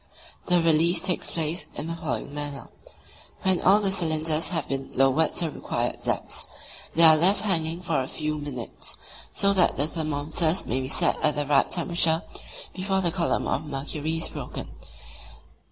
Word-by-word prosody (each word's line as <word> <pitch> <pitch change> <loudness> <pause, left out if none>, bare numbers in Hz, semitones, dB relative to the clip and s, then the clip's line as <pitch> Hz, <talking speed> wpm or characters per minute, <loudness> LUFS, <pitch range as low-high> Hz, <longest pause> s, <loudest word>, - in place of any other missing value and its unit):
The 180 -1 +4
release 165 +2 +3
takes 180 -2 0
place 165 +1 -3
in 145 - -4
the 165 +1 -4
following 150 -4 -5
manner: 145 -1 -6 0.7
when 190 -1 +3
all 195 +3 +5
the 200 -2 0
cylinders 160 -3 +1
have 170 - -3
been 135 0 -4
lowered 135 +4 +3
to 175 - +1
the 160 - -3
required - - -3
depths, - - -3 0.5
they 165 - +7
are 160 -1 +9
left 180 +6 +4
hanging 170 -4 -1
for 160 -6 -1
a 130 - -4
few 155 +1 -3
minutes, 135 -5 -3 0.3
so 200 0 +2
that 185 -3 +2
the 145 - +2
thermometers 155 +2 -1
may 130 +2 -2
be 130 - -4
set 140 - +2
at 150 -1 +3
the 145 0 -1
right 140 -1 +2
temperature 170 -1 +2 0.5
before 190 +1 -1
the 175 -2 0
column 170 -1 0
of 140 - -1
mercury 150 +3 -3
is 165 - +3
broken. - - -7
160 Hz, 170 wpm, -25 LUFS, 145-175 Hz, 0.7 s, are